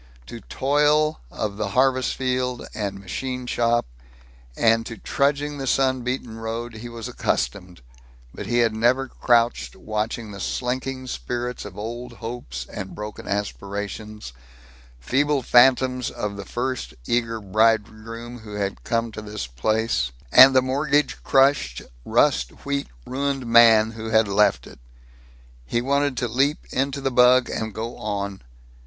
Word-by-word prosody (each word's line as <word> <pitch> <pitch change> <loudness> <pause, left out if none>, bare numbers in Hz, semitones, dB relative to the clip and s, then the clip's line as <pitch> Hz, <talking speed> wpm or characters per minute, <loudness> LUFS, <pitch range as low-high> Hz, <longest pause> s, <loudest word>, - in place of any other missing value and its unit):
To 115 - -9
toil 150 +3 +2
of 100 - -4
the 105 -1 -1
harvest 130 -1 +3
field 125 -1 -1
and 100 -2 -3
machine 125 +7 -4
shop 120 -1 +1 0.7
and 115 0 +3
to 115 - -7
trudging 145 +1 0
the 135 - -4
sun 130 -1 +2
beaten 120 -2 -4
road 115 +1 -5
he 120 +2 -8
was 115 -2 -7
accustomed, 90 -6 -2 0.5
but - - -7
he 120 - 0
had 115 - -1
never 125 +4 +2
crouched 115 - +1
watching 110 +1 -3
the 100 - -9
slinking 130 +4 -3
spirits 125 -1 -4
of 100 -2 -10
old 120 +4 -6
hopes 115 - -6
and 95 +7 -7
broken 105 0 -7
aspirations; 105 - -4 0.7
feeble 140 - +1
phantoms 125 0 +4
of 105 -1 -4
the 100 0 -7
first 125 +1 -3
eager 115 -1 0
bridegroom 110 +3 0
who 105 -2 -9
had 100 -1 -3
come 115 0 -1
to 110 - -7
this 105 -4 -5
place, 65 - 0 0.2
and 130 +1 +9
the 130 - +5
mortgage 145 +3 +1
crushed, 135 - +2 0.2
rust - - +1
wheat 140 0 -1 0.2
ruined 135 0 -2
man 115 -2 +6
who 110 0 -6
had 110 -1 +4
left 105 +1 +2
it. - - -14 0.8
He 120 - -1
wanted 140 +1 0
to 120 - 0
leap 135 +6 0
into 135 +1 -1
the 135 0 0
bug 125 0 +5
and 110 0 -3
go 110 +3 -5
on. 100 -2 -4
115 Hz, 145 wpm, -23 LUFS, 105-130 Hz, 0.8 s, and